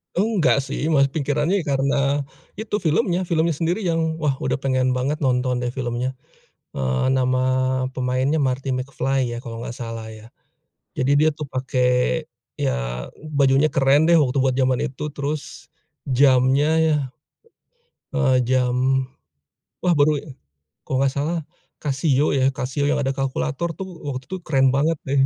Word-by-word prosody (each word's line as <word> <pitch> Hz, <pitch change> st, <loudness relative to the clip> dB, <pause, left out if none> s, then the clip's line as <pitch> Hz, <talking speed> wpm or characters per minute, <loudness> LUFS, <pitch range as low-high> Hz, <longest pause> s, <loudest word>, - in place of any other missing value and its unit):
Enggak, 195 Hz, -7 st, +2 dB
sih, 140 Hz, +3 st, -2 dB
mah. 140 Hz, -3 st, +4 dB
Pikirannya, 150 Hz, +6 st, 0 dB
ya, -, -, -14 dB
karena, 135 Hz, +1 st, +1 dB, 0.6 s
itu 220 Hz, -1 st, -3 dB
filmnya 175 Hz, +2 st, +1 dB
filmnya 165 Hz, -2 st, +1 dB
sendiri 170 Hz, +6 st, -1 dB
yang, 165 Hz, -4 st, -1 dB
wah, 150 Hz, -4 st, +1 dB
udah 130 Hz, +1 st, 0 dB
pengen 130 Hz, -1 st, +1 dB
banget 135 Hz, +5 st, -1 dB
nonton, 125 Hz, -1 st, +1 dB
deh, 120 Hz, -, -1 dB
filmnya. 125 Hz, 0 st, -2 dB, 0.6 s
Eee, 65 Hz, -1 st, 0 dB
nama 130 Hz, -1 st, +2 dB, 0.6 s
pemainnya 130 Hz, +3 st, 0 dB
Marty 135 Hz, -2 st, 0 dB
McFly, 130 Hz, -1 st, -1 dB
ya, 120 Hz, -, -4 dB
kalau 115 Hz, -1 st, -7 dB
enggak 120 Hz, -, -6 dB
salah, 115 Hz, -2 st, -6 dB
ya. 110 Hz, 0 st, -12 dB, 0.7 s
Jadi, 140 Hz, +2 st, +2 dB
dia, 155 Hz, -, +5 dB
tuh, 155 Hz, -, -4 dB
pakai, 125 Hz, -, 0 dB, 0.3 s
ya, -, -, 0 dB, 0.6 s
bajunya 140 Hz, +1 st, +4 dB
keren, 140 Hz, +3 st, +3 dB
deh, 170 Hz, -, +6 dB
waktu 140 Hz, -3 st, +2 dB
buat 130 Hz, -1 st, +1 dB
zaman 130 Hz, -1 st, +2 dB
itu, 135 Hz, +3 st, -4 dB
terus, 145 Hz, +1 st, -5 dB, 0.4 s
jamnya, 130 Hz, +2 st, +4 dB
ya 160 Hz, -1 st, +3 dB, 1.2 s
eee, 130 Hz, -3 st, +3 dB
jam, 130 Hz, +1 st, +1 dB, 0.8 s
wah, 180 Hz, -, +2 dB
baru, 145 Hz, 0 st, +3 dB, 0.6 s
kalau 135 Hz, -, -1 dB
enggak 135 Hz, 0 st, +1 dB
salah 155 Hz, +5 st, -1 dB, 0.5 s
Casio, 140 Hz, 0 st, +1 dB
ya, 130 Hz, -2 st, +2 dB
Casio 135 Hz, +3 st, -2 dB
yang 145 Hz, 0 st, +1 dB
ada 135 Hz, -, 0 dB
kalkulator, 140 Hz, +5 st, -2 dB
tuh. 190 Hz, +4 st, -7 dB, 0.2 s
Waktu 130 Hz, -2 st, -4 dB
itu 190 Hz, -, -2 dB
keren 135 Hz, -3 st, +3 dB
banget, 145 Hz, +5 st, +2 dB
deh, 140 Hz, +1 st, -1 dB
135 Hz, 145 wpm, -22 LUFS, 130-150 Hz, 1.2 s, deh